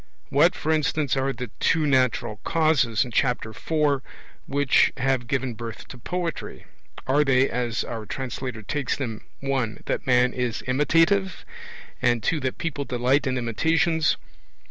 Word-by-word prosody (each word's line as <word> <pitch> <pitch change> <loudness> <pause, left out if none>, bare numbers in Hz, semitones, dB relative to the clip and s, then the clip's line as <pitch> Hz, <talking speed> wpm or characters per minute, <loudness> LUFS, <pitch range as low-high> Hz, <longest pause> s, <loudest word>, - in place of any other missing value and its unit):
What, 165 +6 +4
for 155 - -1
instance, 155 -2 +1
are 135 0 0
the 125 -4 -6
'two 160 -2 +2
natural 130 -6 +1
causes' 145 -5 +2
in 125 - -8
Chapter 120 -2 0
IV 145 +2 0 0.5
which 140 -1 +3
have 130 -1 0
given 130 -1 -1
birth 115 0 -8
to 125 - -10
Poetry? 175 +5 -4 0.4
Are 140 +4 +3
they, 135 -1 +3
as 120 -1 -2
our 115 -3 -6
translator 125 -3 -5
takes 140 +4 -2
them, 115 -6 -4 0.2
(1) 130 -5 -2
that - - -2
man 125 0 +4
is 125 -2 -2
imitative, 165 +8 +2 0.6
and 120 -2 +2
(2) 165 - +1
that 130 -2 -3
people 160 -4 -3
delight 130 +2 +1
in 130 0 0
imitations? 160 +7 +1
130 Hz, 145 wpm, -25 LUFS, 120-150 Hz, 0.6 s, What